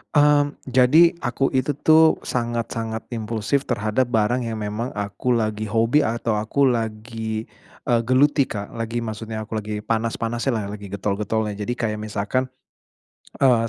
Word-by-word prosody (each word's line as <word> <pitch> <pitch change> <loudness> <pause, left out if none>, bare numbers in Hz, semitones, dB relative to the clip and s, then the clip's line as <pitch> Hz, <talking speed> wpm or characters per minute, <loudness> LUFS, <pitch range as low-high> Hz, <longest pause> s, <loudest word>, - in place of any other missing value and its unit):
Mmm, 145 0 +4
jadi 135 +7 +5
aku 130 +2 +1
itu 130 +3 +2
tuh 160 +3 +5
sangat-sangat 115 -2 -3
impulsif 115 +5 -1
terhadap 120 +1 0
barang 120 +3 +2
yang 115 -2 -4
memang 105 +4 -3
aku 105 +5 -2
lagi 110 -2 0
hobi 115 +7 +2
atau 115 -1 -1
aku 110 +6 +2
lagi, 110 -1 -3 0.4
eee 120 -1 +3
geluti 140 +3 +4
Kak, 100 -5 -6
lagi 115 +1 -2
maksudnya 110 -1 -5
aku 110 - -5
lagi 105 0 -3
panas-panasnyalah, 115 +1 -1
lagi 100 -2 -10
getol-getolnya. 105 +2 -1
Jadi 105 +4 -3
kayak 110 -2 -1
misalkan, 110 +4 -1 1.0
eee, 115 -3 +4
115 Hz, 135 wpm, -23 LUFS, 110-125 Hz, 1.0 s, jadi